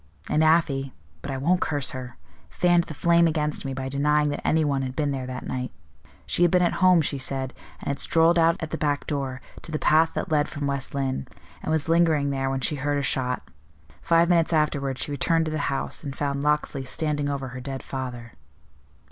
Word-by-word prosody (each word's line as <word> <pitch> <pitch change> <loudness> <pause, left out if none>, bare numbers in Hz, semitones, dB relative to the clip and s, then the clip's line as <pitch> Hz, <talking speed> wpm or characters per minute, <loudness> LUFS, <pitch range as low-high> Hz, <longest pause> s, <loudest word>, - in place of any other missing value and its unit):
And 155 +1 +3
Afy 145 -5 +2 0.3
but 140 - -7
I 135 - -2
won't 175 +7 +1
curse 145 -4 -1
her 125 -2 -7 0.3
fanned 175 -1 +3
the 155 - -8
flame 170 +2 +4
against 150 -2 -1
me 135 - -3
by 130 0 -4
denying 150 +2 +2
that 145 - -3
any 160 0 +2
one 140 -2 0
had 130 -1 -4
been 145 -2 0
there 130 -2 -3
that 125 0 -6
night. 125 0 -3 0.5
'She - - -1
had 175 - +6
been 180 +1 +3
at 175 - +2
home,' 180 -3 +6
she 140 -1 -2
said, 130 0 -3 0.3
'and - - -5
had 140 0 -2
strolled 165 +1 +4
out 165 0 +4
at 160 -1 -5
the - - -3
back 145 -2 0
door, 135 -3 -3 0.2
to 165 - -10
the 155 - -1
path 160 +2 +3
that - - -3
led 150 -1 +3
from 145 -1 -4
West 140 -1 -2
Lynne, 135 - -2 0.3
and - - -3
was 160 -1 +1
lingering 160 -4 +3
there 135 -1 -1
when 135 0 -2
she 150 +4 0
heard 145 +2 0
a 140 - -1
shot. 125 -2 -1 0.5
Five 170 0 +4
minutes 170 -1 +3
afterward 140 -4 +1
she 145 - -2
returned 165 +3 +1
to 155 - -3
the 155 - -2
house, 135 +2 -2
and 140 -3 -5
found 140 -1 -1
Locksley 150 -2 0
standing 145 +2 -1
over 135 -2 -3
her 125 +1 -7
dead 135 0 -6
father. 125 -3 -6
145 Hz, 220 wpm, -25 LUFS, 135-160 Hz, 0.5 s, had